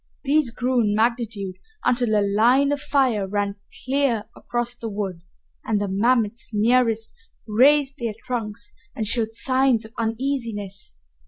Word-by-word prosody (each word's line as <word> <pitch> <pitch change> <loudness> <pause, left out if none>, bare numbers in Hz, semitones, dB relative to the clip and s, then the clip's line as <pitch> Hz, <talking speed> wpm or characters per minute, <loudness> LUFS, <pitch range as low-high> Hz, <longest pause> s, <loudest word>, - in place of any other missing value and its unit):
These 290 -1 +2
grew 245 +1 0
in 210 -2 +1
magnitude 220 -4 -1 0.3
until 245 -3 +2
a 200 - +2
line 240 +8 +4
of 290 - 0
fire 260 -9 +1
ran 200 +1 -2 0.3
clear 260 -5 +1
across 240 0 -3
the 235 -2 -6
wood, 195 -4 -4 0.4
and 215 -2 0
the 205 - -1
mammoths 225 +3 +1
nearest 225 +1 +2 0.3
raised 275 +5 +4
their 230 -3 -3
trunks 230 -2 -4 0.2
and 220 - -2
showed 225 0 0
signs 255 -1 +2
of 220 - -13
uneasiness. 225 - -3
230 Hz, 140 wpm, -23 LUFS, 210-255 Hz, 0.4 s, line